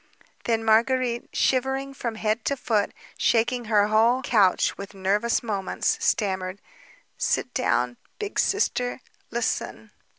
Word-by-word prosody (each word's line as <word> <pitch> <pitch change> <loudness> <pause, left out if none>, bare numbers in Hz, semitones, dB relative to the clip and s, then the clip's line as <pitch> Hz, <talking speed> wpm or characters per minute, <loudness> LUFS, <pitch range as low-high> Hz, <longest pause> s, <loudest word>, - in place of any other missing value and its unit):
Then 225 -1 +1
Marguérite, 235 +2 +2
shivering 265 +1 0
from 235 -4 -4
head 220 +1 -1
to 280 - 0
foot, 215 -5 0 0.3
shaking 240 +1 +2
her 210 -2 +3
whole 230 +4 +3
couch 205 -8 +3
with 200 0 -9
nervous 205 +6 +1
movements, 200 -4 -1
stammered: 190 -2 0 0.6
"Sit 250 - 0
down, 125 - 0 0.2
Big 415 -1 -3
Sister... 250 - 0 0.3
listen." 225 -2 -3
230 Hz, 120 wpm, -25 LUFS, 205-250 Hz, 0.6 s, her